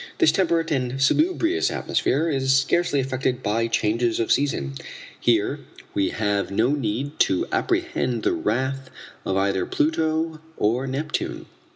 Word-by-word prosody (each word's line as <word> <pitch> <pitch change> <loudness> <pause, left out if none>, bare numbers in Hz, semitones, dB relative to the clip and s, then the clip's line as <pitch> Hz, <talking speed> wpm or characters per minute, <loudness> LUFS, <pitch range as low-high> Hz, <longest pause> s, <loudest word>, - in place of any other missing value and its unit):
This 335 - +5
temperate 165 -3 +1
and 130 -2 -1
salubrious 335 - +2
atmosphere 150 +6 0
is 135 -4 +1
scarcely 145 +3 +2
affected 130 -1 -1
by 115 +3 +1
changes 115 +1 0
of 115 - 0
season. 105 - +1 0.5
Here - - +1 0.3
we 100 - +1
have 105 -2 -1
no 110 +5 +2
need 140 +1 -2
to 95 - +2
apprehend 120 -3 -1
the - - +2
wrath 130 +4 -2 0.4
of 95 - 0
either 95 -2 0
Pluto 160 0 0 0.2
or 120 +6 +1
Neptune." 145 +4 -3
130 Hz, 135 wpm, -23 LUFS, 115-155 Hz, 0.5 s, This